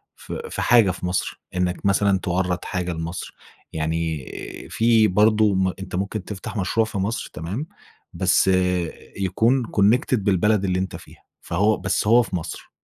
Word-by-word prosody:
في - - -7
في - - -4
حاجة 115 -5 +5
في 90 0 -6
مصر، 90 +1 -2
إنك 90 +1 -1
مثلًا 100 0 +3
توَرّد 90 -1 -1
حاجة 90 -1 -2
لمصر، 85 +1 -6 0.4
يعني 80 -2 -2 0.4
في 115 -1 +4
برضه 105 +2 +4
م 95 -1 +1
أنتَ 95 -2 -6
ممكن 100 +2 -2
تفتح 105 +2 -6
مشروع 110 +4 +1
في 110 - -6
مصر 100 +4 -2
تمام، 95 - -4 0.5
بس 95 +1 +2 0.7
يكون 115 +7 +2
connected 110 +6 +4
بالبلد 100 0 +2
اللي 90 -1 0
أنتَ 95 0 -3
فيها، - - -14 0.2
فهو 105 +5 +1
بس 100 +1 -1
هو 120 +3 +6
في 95 - -5
مصر. 85 - -6
95 Hz, 155 wpm, -23 LUFS, 90-110 Hz, 0.7 s, هو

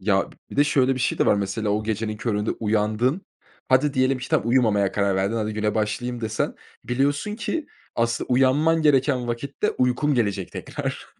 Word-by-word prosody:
Ya, 95 0 +1
b - - -20
bir - - -8
de 145 - +5
şöyle 135 -2 +2
bir 130 - -5
şey 120 - 0
de - - +2
var, - - +5
mesela 100 +2 -2
o 105 +1 0
gecenin 110 0 -2
köründe 105 -1 -1
uyandın. 110 - 0 0.5
Hadi, 135 +3 +3
diyelim 130 0 +2
ki, 125 0 -7
tamam, 115 - +1
uyumamaya 110 -6 +3
karar 100 -1 +1
verdin. 100 +4 0
Hadi, 110 -1 -2
güne 105 0 -1
başlayayım 115 +3 -2
desen, 110 -1 -2 0.3
biliyorsun 145 +10 0
ki, 230 +8 -3 0.3
asıl 115 0 0
uyanman 145 +6 +3
gereken 135 -4 +3
vakitte 125 +4 -2
uykun 125 +4 +1
gelecek 100 -6 -1
tekrar. - - -5
120 Hz, 180 wpm, -24 LUFS, 105-135 Hz, 0.5 s, de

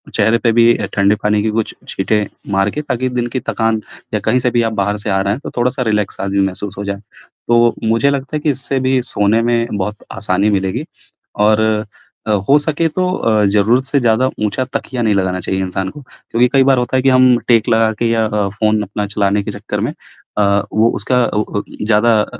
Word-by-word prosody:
चेहरे 110 +3 +3
पे 115 -1 +1
भी 115 +1 +5
अ, - - -3
ठंडे 100 +1 +3
पानी 105 0 +2
के 110 - 0
कुछ 110 0 -2
छींटे 105 +2 0 0.2
मार 95 +1 +2
के 150 - -4
ताकि 130 -3 -2
दिन 120 -1 -2
की - - +1
थकान 110 -1 0 0.3
या - - +1
कहीं 125 - +3
से 125 -1 0
भी 120 - +2
आप 110 - -7
बाहर 105 0 -1
से 105 +1 -5
आ 95 - +1
रहे 100 +1 0
हैं, 125 - -5
तो - - -6
थोड़ा-सा 125 +2 0
रिलैक्स 105 -3 -1
भी 100 0 -1
महसूस 95 +1 -6
हो 100 - -4
जाए। 100 0 -4 0.5
तो 120 0 +4
मुझे 115 +5 +2
लगता 140 +1 -3
है - - -4
कि 150 -1 +2
इससे 135 0 -2
भी 130 0 +1
सोने 105 +3 +2
में 120 0 +1
बहुत 105 +2 -4
आसानी 100 +1 0
मिलेगी 95 -2 -1 0.6
और 110 0 +4 0.7
अ, - - +1 0.2
हो 145 - +7
सके 155 +2 0
तो 180 +3 -1
अ, 110 - +1
ज़रूरत 105 +6 +3
से 140 +1 +1
ज़्यादा 120 +1 +2 0.2
ऊँचा 115 +5 -1
तकिया 125 -2 -3
नहीं 110 -2 +2
लगाना 95 -1 0
चाहिए 95 +2 -2
इंसान 95 0 -3
को, 145 - -11
क्योंकि 125 -1 -1
कई 135 -1 +5
बार 135 -1 +3
होता 125 +1 -1
है 130 - +2
कि 135 - +4
हम 130 -1 +5
टेक 115 -2 +4
लगा 110 -1 +3
के 115 -1 +1
या 115 -1 +2
अ, 105 -2 -1
फ़ोन 105 +1 0
अपना 105 +1 -4
चलाने 100 0 0
के 105 - -4
चक्कर 105 +1 -5
में - - -2 0.4
अ, 100 -1 +3
वो 110 +2 +3
उसका 125 +4 +1
अ 105 - -1 0.2
अ, - - -3 0.2
ज़्यादा 110 0 +3
110 Hz, 225 wpm, -16 LUFS, 100-125 Hz, 0.7 s, हो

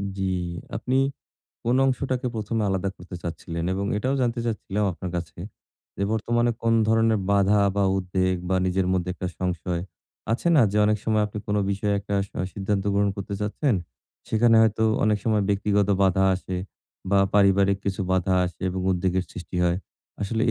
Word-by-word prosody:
জি, 95 - -3 0.5
আপনি 130 +1 -1 0.7
কোন 120 +2 +2
অংশটাকে 130 -1 -1
১ম 110 +1 -3
এ - - +1
আলাদা 95 0 0
করতে 90 0 -9
চাচ্ছিলেন 85 0 -4
এবং 100 +1 -2
এটাও 130 +6 0
জানতে 120 -1 0
চাচ্ছিলাম 105 -2 -2
আপনার 90 +1 -6
কাছে 85 -1 -6 0.6
যে 100 - -2
বর্তমানে 120 +2 +1
কোন 115 - +2 0.2
ধরনের 115 -1 +3
বাধা 100 +1 +4 0.2
বা 100 - +3
উদ্বেগ 95 0 0
বা 95 - +2
নিজের 95 0 +1
মধ্যে 90 -1 0
একটা 90 - -4
সংশয়, 90 -1 -2 0.5
আছে 120 - -2
না 135 - +7
যে 105 - -1
অনেক 105 0 +2
সময় 110 -1 +2
আপনি 105 - -7
কোন 105 0 0
বিষয়ে 100 +1 0
একটা 100 0 -4
সা - - -10
সিদ্ধান্ত 100 0 -1
গ্রহণ 100 0 +2
করতে 100 0 -5
চাচ্ছেন, 105 +5 0 0.5
সেখানে 115 +1 +4
হয়তো 110 0 +2 0.2
অনেক 105 -1 +2
সময় 110 -2 +2
ব্যক্তিগত 100 0 +1
বাঁধা 95 0 +3
আসে 95 0 -4 0.5
বা 100 - +4 0.2
পারিবারিক 100 -1 +4
কিছু 100 -1 -2
বাঁধা 95 0 +2
আসে 90 -2 -6
এবং 95 0 -3
উদ্বেগের 90 +1 0
সৃষ্টি 90 0 -7
হয়। 85 +1 +1 0.4
আসলে 110 +3 -1
100 Hz, 170 wpm, -25 LUFS, 95-110 Hz, 0.7 s, না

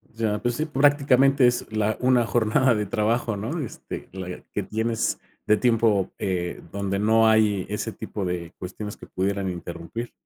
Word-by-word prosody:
Ya, 110 -2 0
pues 120 +1 0
sí. 155 - -1
Prácticamente 140 -2 +4
es 120 -2 -1
la 110 0 0
una 125 -2 +3
jornada 120 +2 +3
de 105 0 -1
trabajo, 115 +1 0
¿no? 115 +12 -3
Este, 135 -8 -7
la 90 -1 -6
que 105 - -1
tienes, 110 +3 -1 0.3
de 105 - +4
tiempo, 110 -5 +2
eh, 90 -3 -2
donde 100 0 -2
no 110 +2 +4
hay 105 -4 +3
ese 105 +2 -3
tipo 105 -2 -5
de 90 -2 -4
cuestiones, 105 +3 -7
que - - -11
pudieran 100 0 -1
interrumpir. 85 +6 -6
110 Hz, 165 wpm, -25 LUFS, 100-120 Hz, 0.3 s, Prácticamente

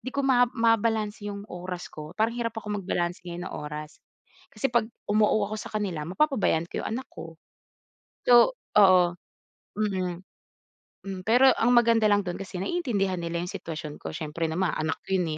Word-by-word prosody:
hindi 260 - -6
ko 280 - 0
mab 245 -2 +4
mabalanse 220 -2 +1
yung 200 0 -6
oras 180 0 -6
ko 155 +3 -9
parang 220 +2 +2
hirap 230 -2 -2
ako 210 -1 -3
magbalanse 175 -1 -2
ngayon 175 0 -5
ng - - -7
oras. 150 +1 -7 0.5
Kasi 270 - -1
'pag 235 -2 +3 0.2
um-oo 210 0 +3
ako - - -3
sakanila 190 -9 -3
mapapabayan 205 - +1
ko - - -3
'yong - - -4
anak 260 - -6
ko. 165 -1 -9 0.9
So 245 - +6 0.2
oo 180 -3 +6 0.6
hmm. 185 -4 -2 1.0
Pero 250 +4 +6
ang 235 +2 +3
maganda 230 -2 +4
lang 205 -1 +4
dun 180 -2 -4
kasi 195 -2 -6
naiintindihan 200 - -1
nila 170 0 -3
yung 180 - -4
sitwasyon 160 -6 -6
ko 80 - -7
siiyempre 155 +2 -4
naman 175 +3 0
anak 155 0 -1
ko 190 - +2
yun 165 -3 -1
195 Hz, 170 wpm, -27 LUFS, 175-225 Hz, 1.0 s, So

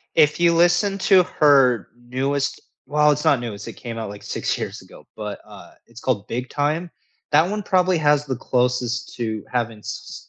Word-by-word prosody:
If 150 -2 +4
you 170 0 +4
listen 175 +4 +3
to 190 -1 +5
her 135 - +3
newest 135 +3 -2 0.3
well, 150 +2 +3
it's 150 +1 -3
not 135 -4 +4
new, 115 -3 -5
it's 100 0 -9
it - - -8
came 115 -2 -7
out, 110 -3 -5
like, 100 0 -10
6 - - -2
years - - -5
ago, - - -16
but, 105 -2 -6
uh, - - -13 0.2
it's 120 0 -13
called 105 -6 -1
Big 125 +2 -4
Time. 155 +4 -1 0.4
That 155 +3 +4
one 210 +1 -3
probably 185 -2 +2
has 150 -1 +2
the 130 -3 -2
closest 125 -1 -1
to 110 -3 -3
having, 115 -3 -2
s 110 +2 -8
135 Hz, 195 wpm, -22 LUFS, 120-155 Hz, 0.4 s, to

